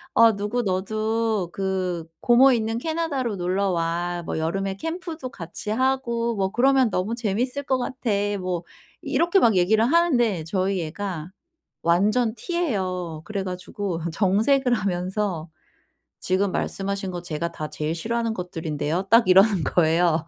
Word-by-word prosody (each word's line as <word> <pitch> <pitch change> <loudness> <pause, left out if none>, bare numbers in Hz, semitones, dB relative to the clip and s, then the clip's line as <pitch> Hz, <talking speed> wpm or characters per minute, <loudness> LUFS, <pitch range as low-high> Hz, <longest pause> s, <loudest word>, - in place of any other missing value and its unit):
어 230 -2 +6
"누구 210 +5 -2
너도 215 0 -1
그 185 -3 -2 0.2
고모 250 +3 +6
있는 225 -1 -1
캐나다로 295 -7 -2
놀러 190 +2 0
와. 175 0 -1
뭐 - - -3
여름에 190 +4 -2
캠프도 325 - -5
같이 175 0 -8
하고 235 -1 0
뭐 190 -2 0
그러면 260 +1 +4
너무 200 +3 -1
재밌을 245 +5 -1
것 260 -1 +1
같아." 255 0 -4 0.3
뭐 180 -2 -3 0.4
이렇게 345 +3 +2
막 225 - +4
얘기를 215 +5 +3
하는데 245 - +2
저희 185 +1 0
애가 175 -1 -5 0.5
완전 210 +7 +2
T예요. 190 - -2
그래 200 -3 -3
가지고 185 -1 -4
정색을 225 - +2
하면서 185 -4 -2 0.7
"지금 190 +2 +1
말씀하신 195 0 -2
거 175 -1 -5
제가 170 0 -3
다 155 -2 -5
제일 155 +1 -2
싫어하는 230 +6 -1
것들인데요." 165 -2 -3
딱 230 -2 +6
이러는 190 -2 +5
거예요. 165 +1 +2
200 Hz, 295 characters per minute, -24 LUFS, 180-235 Hz, 0.7 s, 어